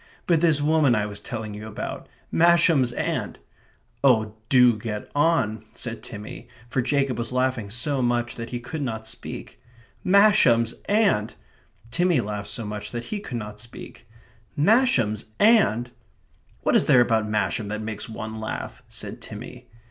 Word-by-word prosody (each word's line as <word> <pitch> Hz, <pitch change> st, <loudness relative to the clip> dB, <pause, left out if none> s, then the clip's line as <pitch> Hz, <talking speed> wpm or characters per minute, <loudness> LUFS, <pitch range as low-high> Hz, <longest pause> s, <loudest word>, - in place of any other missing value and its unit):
"But 165 Hz, -3 st, +3 dB
this 160 Hz, -4 st, +3 dB
woman 150 Hz, -5 st, +4 dB
I 105 Hz, -1 st, 0 dB
was 105 Hz, -1 st, -7 dB
telling 110 Hz, -3 st, -6 dB
you 105 Hz, +1 st, -7 dB
about 110 Hz, -, -6 dB, 0.2 s
Masham's 165 Hz, -6 st, +4 dB
aunt -, -, -2 dB, 0.3 s
" -, -, -38 dB
"Oh, 110 Hz, -6 st, +4 dB, 0.2 s
do 125 Hz, -3 st, +6 dB
get 105 Hz, -1 st, -5 dB
on," 135 Hz, -9 st, +1 dB
said 120 Hz, -2 st, -4 dB
Timmy, 105 Hz, +2 st, -9 dB, 0.2 s
for 130 Hz, -, +1 dB
Jacob 135 Hz, -1 st, 0 dB
was 120 Hz, +1 st, -2 dB
laughing 125 Hz, -4 st, 0 dB
so 130 Hz, +5 st, -1 dB
much 120 Hz, -1 st, 0 dB
that 115 Hz, 0 st, -7 dB
he 120 Hz, -, -4 dB
could 145 Hz, +6 st, -6 dB
not 110 Hz, -5 st, -3 dB
speak. -, -, -8 dB, 0.4 s
"Masham's 185 Hz, -, +5 dB
aunt..." 200 Hz, -, +2 dB, 0.6 s
Timmy 175 Hz, -2 st, +2 dB
laughed 105 Hz, -2 st, -4 dB
so 115 Hz, -, -4 dB
much 105 Hz, 0 st, -5 dB
that 120 Hz, -1 st, -5 dB
he 210 Hz, -, -2 dB
could 125 Hz, -, -5 dB
not 105 Hz, -1 st, -7 dB
speak. 115 Hz, 0 st, -10 dB, 0.5 s
"Masham's 145 Hz, -, +3 dB
aunt..." 195 Hz, -, +4 dB, 0.7 s
"What -, -, +2 dB
is -, -, +4 dB
there 125 Hz, -, +6 dB
about 110 Hz, -2 st, +1 dB
Masham 105 Hz, 0 st, 0 dB
that 105 Hz, +1 st, -4 dB
makes 110 Hz, -1 st, -5 dB
one 110 Hz, 0 st, -6 dB
laugh?" 110 Hz, -, -5 dB
said -, -, -6 dB
Timmy. -, -, -9 dB
120 Hz, 155 wpm, -24 LUFS, 110-145 Hz, 0.7 s, do